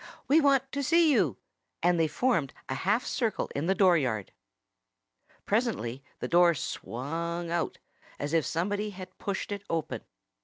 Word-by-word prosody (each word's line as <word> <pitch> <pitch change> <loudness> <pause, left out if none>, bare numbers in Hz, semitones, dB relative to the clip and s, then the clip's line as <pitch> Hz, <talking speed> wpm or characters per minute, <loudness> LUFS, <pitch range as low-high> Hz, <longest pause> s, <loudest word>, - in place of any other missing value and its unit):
"We 310 +4 +5
want 270 -2 +3
to 280 - -2
see 330 +3 +4
you!" 175 - +2 0.5
And 175 0 +3
they 160 - +3
formed 170 - 0
a - - -2
half 210 - +1
circle 225 -5 -1
in 145 +4 -2
the 190 - +3
dooryard. 140 - +2 1.1
Presently 200 - -1
the - - -4
door 175 0 +5
swung 165 +7 -4
out, 170 -1 -1 0.4
as 145 +2 -3
if 165 -2 +4
somebody 205 +7 -1
had 185 -2 -10
pushed 200 +1 -3
it 200 -1 -4
open. 165 -2 -2
175 Hz, 150 wpm, -29 LUFS, 160-215 Hz, 1.1 s, We